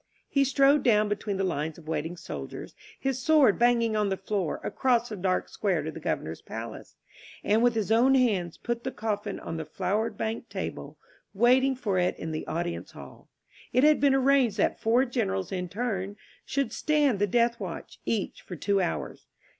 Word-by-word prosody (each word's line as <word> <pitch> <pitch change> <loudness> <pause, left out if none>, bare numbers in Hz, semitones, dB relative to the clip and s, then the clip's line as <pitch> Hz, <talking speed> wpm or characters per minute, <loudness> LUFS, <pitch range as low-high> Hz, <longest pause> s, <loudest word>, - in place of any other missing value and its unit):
He 275 - +2
strode 275 +2 +4
down 210 -3 +3
between 205 -1 -2
the 195 - 0
lines 160 -3 -2
of 160 -2 -15
waiting 160 +2 -3
soldiers, - - -7 0.3
his 265 -1 -1
sword 285 -6 +4
banging 235 -2 +3
on 210 -1 +1
the 190 - -1
floor, 190 -4 -2
across 245 -2 +1
the 215 - -5
dark 185 -1 0
square - - -1
to - - -4
the - - -8
Governor's - - -3
palace; - - -8 0.5
and, 215 +2 +3
with 240 -1 +3
his 220 -1 -1
own 250 +4 +5
hands, 200 -10 +1
put 235 -1 -3
the 260 - -2
coffin 205 -3 -3
on 165 - -5
the 160 - -3
flower 200 +4 -1
banked 225 +1 -4
table - - -6 0.4
waiting 255 +5 +4
for 205 -7 -1
it 180 - +1
in 160 - -5
the 155 - -4
audience 170 +1 -4
hall. - - -13 0.4
It 255 - +4
had 300 0 +5
been 280 -2 +4
arranged 265 -5 +3
that - - +1
four 235 +4 +3
generals 95 - -2
in 180 -2 -3
turn 200 -2 -3 0.3
should 275 0 -1
stand 295 -8 +2
the 205 - +2
death 235 +3 +2
watch, - - -7
each 215 -4 -2
for 180 - -8
two 200 +4 +1
hours. 175 - -4
220 Hz, 185 wpm, -27 LUFS, 190-250 Hz, 0.5 s, own